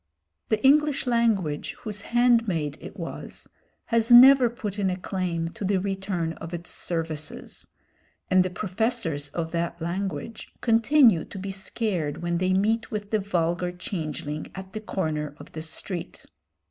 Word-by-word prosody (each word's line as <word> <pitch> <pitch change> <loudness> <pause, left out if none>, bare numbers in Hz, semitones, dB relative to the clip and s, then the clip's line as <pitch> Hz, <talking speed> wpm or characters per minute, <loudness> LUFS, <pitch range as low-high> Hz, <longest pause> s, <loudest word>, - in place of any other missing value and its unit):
The 220 +3 +1
English 295 +1 +4
language, 220 -11 +1
whose 210 -2 -5
handmaid 230 - +2
it - - -9
was, - - -6 0.4
has 230 0 +1
never 255 +1 +9
put 215 -4 -5
in 195 -2 +2
a 180 - -2
claim 180 -3 -2
to 185 - -8
the 195 0 +2
return 190 -4 -2
of 165 +1 -5
its 170 0 -5
services, 160 -3 -4 0.6
and 185 0 +5
the 185 - -2
professors 185 - -1
of 165 +2 -4
that 170 0 -2
language 180 +3 -4
continue 230 - +5
to - - -10
be 195 +1 -4
scared 190 -6 -2
when 170 0 0
they 185 0 +1
meet 215 +4 +1
with 205 -2 -5
the 215 - +2
vulgar 175 -2 0
changeling 155 -4 -5
at 190 +1 -8
the 215 - -4
corner 155 -8 -2
of - - -13
the 155 - -6
street. 165 +2 -6
190 Hz, 150 wpm, -26 LUFS, 165-220 Hz, 0.6 s, never